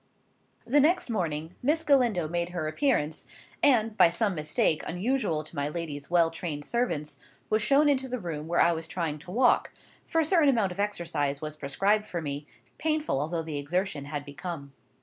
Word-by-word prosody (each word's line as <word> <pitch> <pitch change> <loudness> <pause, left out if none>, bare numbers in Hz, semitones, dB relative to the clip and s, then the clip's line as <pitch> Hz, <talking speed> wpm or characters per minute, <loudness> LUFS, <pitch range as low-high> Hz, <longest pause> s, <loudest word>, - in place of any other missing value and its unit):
The 285 +5 +3
next 315 -2 +3
morning, 165 -5 -2
Miss 310 +5 +1
Galindo 245 - +3
made 170 +1 -2
her 175 -3 -3
appearance, 160 - 0 0.4
and, 225 -6 +3
by 175 - +6
some 200 +3 0
mistake, 155 -1 +1
unusual 180 - -1
to 155 - -11
my 145 0 -1
lady's 150 -3 -5
well 170 -2 +3
trained 155 -3 -5
servants, 150 - -1 0.3
was 215 0 +3
shown 280 +7 +4
into 265 -2 +2
the 255 0 -3
room 160 -7 -5
where 170 +1 +2
I 170 - +4
was 165 -1 -3
trying 160 -4 -3
to 150 - -14
walk; 245 +6 +3 0.4
for 325 - +1
a 320 - +3
certain 320 -3 +4
amount 220 -8 +2
of 180 - -8
exercise 160 -8 -1
was 155 0 -5
prescribed 195 +9 0
for 175 - -3
me, 145 -1 -5 0.3
painful 305 - 0
although 165 +2 -2
the 155 -2 -4
exertion 155 0 -2
had 145 -1 -5
become. 145 -1 -7
175 Hz, 185 wpm, -28 LUFS, 150-235 Hz, 0.4 s, by